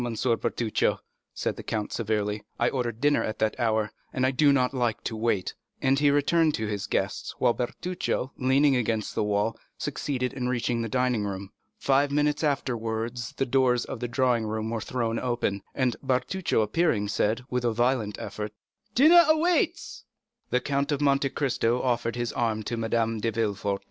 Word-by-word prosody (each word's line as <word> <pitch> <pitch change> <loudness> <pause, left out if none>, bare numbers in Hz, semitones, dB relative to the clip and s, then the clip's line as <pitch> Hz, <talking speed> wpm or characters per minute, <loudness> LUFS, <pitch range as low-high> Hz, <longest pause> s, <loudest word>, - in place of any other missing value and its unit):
Bertuccio," 115 -1 0 0.3
said - - -3
the - - -5
count 110 -2 -3
severely; 105 -2 -1
"I 120 - +2
ordered 120 -3 -3
dinner 145 0 +3
at 110 - -3
that 110 0 0
hour, 110 -2 +1 0.2
and 130 - 0
I 130 - +3
do 145 +2 +4
not 130 -1 +2
like 120 -4 -1
to 115 - -3
wait;" 110 -4 0 0.3
and 135 +1 +2
he 145 0 +4
returned 150 +2 +3
to 110 - -2
his 105 -2 -3
guests, - - -2
while 120 - +3
Bertuccio, 140 +2 -3
leaning 135 +2 +3
against 115 -3 -1
the - - 0
wall, 105 +2 0 0.2
succeeded 125 -3 -2
in 125 -2 -2
reaching 120 -1 0
the 115 - -3
dining 125 -2 +1
room. 100 -1 -5 0.3
Five 140 +1 +2
minutes 150 +1 +1
afterwards 115 -5 -2
the 135 - +1
doors 125 -1 +2
of - - -6
the 120 - -2
drawing 120 -2 +1
room 110 +1 -3
were 115 -1 -2
thrown 115 -1 -2
open, 120 -5 -1
and 130 -3 +1
Bertuccio 135 +1 0
appearing 105 -2 +1
said, 110 +3 0
with 125 -1 0
a 120 - +2
violent 120 -2 0
effort, 105 +1 -5 0.4
"The 255 - +4
dinner 340 +2 +8
waits." 345 +2 0 0.5
The 125 - +1
Count 140 +2 -1
of 145 - 0
Monte 140 -1 +2
Cristo 125 -4 0
offered 120 -2 0
his 120 -2 -2
arm 110 -2 0
to 120 - -3
Madame 115 0 0
de 115 - 0
Villefort. 100 -3 -1
120 Hz, 180 wpm, -27 LUFS, 110-135 Hz, 0.5 s, dinner